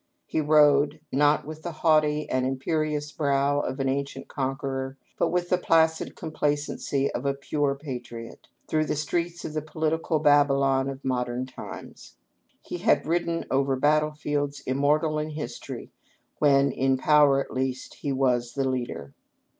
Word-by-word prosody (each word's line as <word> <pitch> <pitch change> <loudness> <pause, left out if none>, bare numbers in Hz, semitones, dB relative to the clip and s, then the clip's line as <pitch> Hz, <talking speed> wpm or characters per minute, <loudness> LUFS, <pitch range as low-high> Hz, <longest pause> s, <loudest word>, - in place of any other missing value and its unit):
He 155 - -1
rode, 150 -1 +4
not 145 +2 +3
with 155 +1 -8
the 175 - -4
haughty 155 -2 +2
and 130 0 0
imperious 150 +3 -1
brow 140 -1 +1
of 135 -1 -3
an 135 - 0
ancient 140 +1 -3
conqueror, 135 -1 -3 0.2
but - - +3
with 175 0 -1
the 180 - +2
placid 160 -2 +2
complacency 145 -2 -1
of 120 - -4
a 140 0 0
pure 140 0 -1
patriot, 125 -5 -8 0.2
through 155 0 +1
the - - -1
streets 170 +3 -2
of 155 - -5
the 155 - -1
political 160 +1 -1
Babylon 140 -2 +3
of 135 0 -8
modern 125 -1 -1
times. 130 - -10 0.5
He - - -6
had - - +3
ridden 170 +1 -1
over 135 0 +2
battle 150 +3 +2
fields 145 -1 -2
immortal 150 +4 +1
in 155 +1 -3
history, 155 0 -7 0.5
when, 140 -2 +4
in 135 +1 +1
power 145 0 +5
at 135 - -5
least, 130 0 -3
he 145 - -1
was 125 -3 +1
the 135 -1 0
leader. 120 - -4
145 Hz, 155 wpm, -26 LUFS, 135-155 Hz, 0.5 s, power